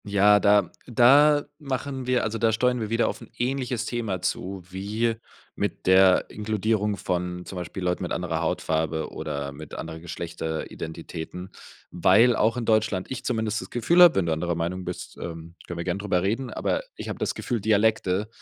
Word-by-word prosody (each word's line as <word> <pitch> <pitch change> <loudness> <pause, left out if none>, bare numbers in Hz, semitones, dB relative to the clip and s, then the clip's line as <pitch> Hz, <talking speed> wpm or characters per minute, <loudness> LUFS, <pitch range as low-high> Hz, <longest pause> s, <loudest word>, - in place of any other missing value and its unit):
Ja, 105 0 +5
da 100 -4 +4 0.2
da 145 +5 +5
machen 135 -2 -4
wir 125 -1 +2
also, 110 0 -2
da 115 -1 +3
steuern 125 +3 +1
wir 110 -2 -3
wieder 115 +1 +2
auf - - -4
'n 115 - -12
ähnliches 125 -2 -1
Thema 115 -7 -2
zu 95 +1 -3
wie 105 +5 -1 0.4
mit - - -3
der 95 0 +5
Inkludierung 105 -1 -1
von 90 0 -3
zum 95 - -8
Beispiel 90 +2 -5
Leuten 90 0 0
mit 90 - -4
anderer 85 -2 -2
Hautfarbe 80 -1 -1
oder 70 -2 -4
mit 75 +1 -10
anderen 80 0 -7
Geschlechteridentitäten, 85 +1 -6 0.4
weil 105 +8 +5
auch 115 +3 +2
in 120 - -2
Deutschland 110 -3 +1
ich 130 - -4
zumindest 110 -3 -1
das - - -9
Gefühl 165 +10 +3
hab- 175 - +9
wenn 95 - +2
du 80 - +1
anderer 85 +2 -1
Meinung 90 +2 -3
bist, - - -7
ähm, 85 0 -7
können 85 - -6
wir 85 - -3
gern 90 +2 -2
drüber 100 -3 0
reden- 115 +6 -1
aber - - -1
ich - - -7
hab - - -5
das - - -1
Gefühl, 120 -4 -2
Dialekte 105 -2 +2
100 Hz, 180 wpm, -25 LUFS, 90-115 Hz, 0.4 s, hab